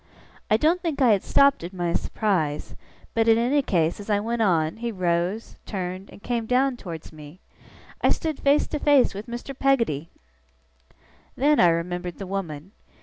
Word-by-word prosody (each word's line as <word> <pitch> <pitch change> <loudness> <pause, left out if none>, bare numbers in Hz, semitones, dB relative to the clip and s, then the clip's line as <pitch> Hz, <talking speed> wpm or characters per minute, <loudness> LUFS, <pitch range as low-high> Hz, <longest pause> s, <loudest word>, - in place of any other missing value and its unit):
I 215 - +4
don't 330 +8 +2
think 325 -5 -3
I 255 -4 +5
had 200 -3 +3
stopped 280 -7 +3
in 170 - -4
my 175 -1 -1
surprise; 170 -11 -1 0.4
but, 225 0 +1
in 225 0 +6
any 255 +5 +2
case, 170 -9 0
as 205 - -9
I 205 -1 +2
went 230 +2 -2
on, 165 -5 +1
he 235 +1 -3
rose, 180 +2 -2
turned, 185 -1 -5
and - - -15
came 235 -2 -2
down 255 +2 +2
towards 165 -9 -9
me. 155 +3 -12 0.6
I - - +3
stood 315 -4 -1
face 285 +1 +3
to 300 - -3
face 285 -4 +4
with 205 +3 -7
Mr. 240 +3 -6
Peggotty! 230 - +1 1.3
Then 295 +3 +3
I 175 - +7
remembered 175 +1 -2
the 195 - -6
woman. 185 -3 -5
205 Hz, 175 wpm, -24 LUFS, 175-250 Hz, 1.3 s, I